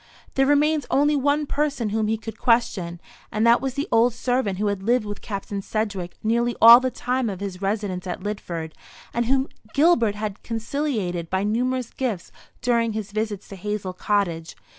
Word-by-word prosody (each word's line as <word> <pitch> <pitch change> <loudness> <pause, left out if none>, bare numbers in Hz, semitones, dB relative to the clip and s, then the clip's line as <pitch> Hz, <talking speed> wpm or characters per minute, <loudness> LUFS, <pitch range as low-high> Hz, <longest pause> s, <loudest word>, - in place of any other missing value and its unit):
There 270 0 +3
remained 295 +1 +3
only 290 +2 +3
one 285 +2 +1
person 285 -6 -1
whom 215 +1 0
he 220 +1 0
could 225 0 -8
question, 200 -8 +1 0.3
and 215 +1 +1
that 235 +1 +5
was 270 -1 -3
the 285 - -2
old 230 +1 +4
servant 245 -6 0
who 210 - -1
had 200 -2 -1
lived 235 +2 +2
with 205 -1 -6
Captain 200 -1 -4
Sedgewick 195 -4 -3
nearly 235 +2 +1
all 235 +1 +10
the 255 0 -1
time 250 -1 -1
of 190 -3 -5
his 195 -2 -5
residence 195 -2 -2
at 180 +1 -5
Lidford, 170 -6 -4 0.4
and 235 0 0
whom 265 +1 +2 0.3
Gilbert 275 -9 +4
had 210 -1 -5
conciliated 225 - -2
by 190 +1 0
numerous 245 +3 -1
gifts 230 -9 -3 0.3
during 235 -2 +2
his 210 -2 -4
visits 215 -2 -3
to 195 - -8
Hazel 195 -1 -4
Cottage. 180 -5 -1
220 Hz, 180 wpm, -24 LUFS, 200-250 Hz, 0.4 s, all